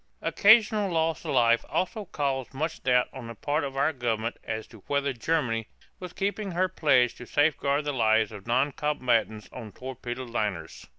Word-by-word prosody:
Occasional 210 -2 +4
loss 160 -2 0
of - - -4
life 115 -1 +4
also 210 +3 -2
caused 135 -5 -3
much 155 +4 -3
doubt 125 -1 +3
on 125 -3 -8
the 115 - -8
part 145 +7 -1
of 135 -1 -5
our 145 +3 +2
government 115 -3 -2
as 110 0 -4
to 110 - -14
whether 140 -1 0
Germany 115 -4 -1 0.3
was 180 -2 -7
keeping 200 0 -3
her 185 +2 +2
pledge 140 -9 +3
to 125 - -10
safeguard 145 -1 +1
the 145 - -1
lives 110 -3 +2
of 105 0 -10
noncombatants 125 -4 0
on 115 -4 -8
torpedoed 125 +1 -7
liners. 105 -4 -3
135 Hz, 170 wpm, -27 LUFS, 115-160 Hz, 0.3 s, Occasional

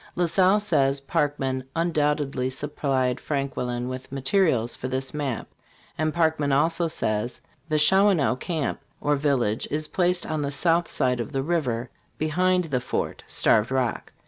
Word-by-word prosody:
La 175 - +2
Salle, 185 +4 +4
says 140 -10 +2
Parkman, 135 -2 -1
".undoubtedly 150 -5 0
supplied 130 -2 -1
Franquelin 125 -4 -2
with 130 +1 -7
materials" 135 - +1
for 130 - -5
this 130 +1 -2
map. 145 -5 -3 0.5
And 155 0 0
Parkman 160 -3 +1
also 165 +5 +2
says: 110 -5 -1 0.3
"The 155 - +1
Shawanoe 170 -4 +4
camp, 160 -3 -2 0.2
or 145 0 +1
village, 135 -7 0
is 155 +1 -2
placed 180 -1 +1
on 155 -1 -2
the 140 - -1
south 165 +4 +1
side 125 -1 0
of 115 - -4
the 135 0 0
river, 130 -7 -1 0.3
behind 180 +4 +2
the 135 -7 -2
fort - - -3
(Starved 105 +1 +2
Rock). 130 -3 -1
145 Hz, 145 wpm, -25 LUFS, 130-165 Hz, 0.5 s, Salle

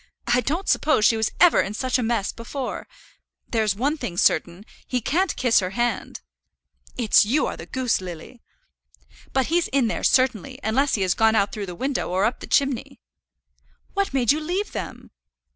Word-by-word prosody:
I 240 +1 +2
don't 320 - -2
suppose 300 -9 +2
she 225 - +5
was 220 -1 0
ever 355 -2 +6
in 205 - -4
such 255 +2 0
a - - 0
mess 225 -3 -1
before. 250 +3 -6 0.6
There's 220 -4 0
one 280 +8 0
thing 175 - -5
certain, 175 +5 +1 0.2
he 250 - -1
can't 345 - 0
kiss 245 -3 +3
her 185 -2 -2
hand." 240 0 -2 0.8
"It's 235 -4 +5
you 255 +9 +1
are - - -3
the - - -10
goose, 255 -6 -1
Lily." 180 +7 -9 0.9
"But 265 -1 +1
he's 345 0 +2
in 270 -2 +1
there - - -3
certainly, 255 -1 +1
unless 270 +6 +1
he 200 - 0
has 185 -2 +2
gone 225 0 +3
out 200 -1 +2
through 205 -2 -5
the 180 - -7
window, 270 +7 -2
or 185 +3 +1
up 235 +3 -1
the - - -9
chimney." 275 -3 0 0.9
"What 395 0 -1
made 255 -4 +2
you 300 - +1
leave 360 +7 -3
them?" - - -7
240 Hz, 185 wpm, -23 LUFS, 210-275 Hz, 0.9 s, ever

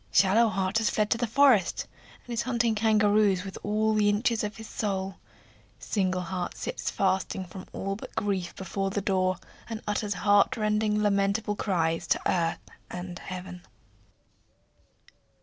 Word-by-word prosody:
Shallow 215 +4 +5
heart 190 +2 0
has 220 - +2
fled 210 -1 0
to 230 - +2
the 240 - 0
forest, 250 -4 +4 0.4
and 245 - -6
is 230 - 0
hunting 235 -2 +1
kangaroos 210 -3 +3
with 195 - -7
all 215 +1 +1
the 210 -1 +3
inches 220 +2 +1
of 210 0 -4
his 220 0 -9
soul. 195 -2 -3 0.6
Single 185 -3 -1
heart 180 0 -4
sits - - -3
fasting 190 -1 0
from 185 +2 -10
all 195 +1 -3
but 210 - -10
grief 200 -5 -1
before 195 0 -3
the 205 - -1
door, 185 -1 +1 0.3
and 225 -1 -4
utters 210 0 -1
heartrending, 210 0 +2
lamentable 205 +1 +1
cries 165 -6 0
to - - +1
earth 170 -2 0 0.2
and 180 0 -6
heaven. 180 -1 -7
205 Hz, 150 wpm, -28 LUFS, 190-215 Hz, 0.6 s, Shallow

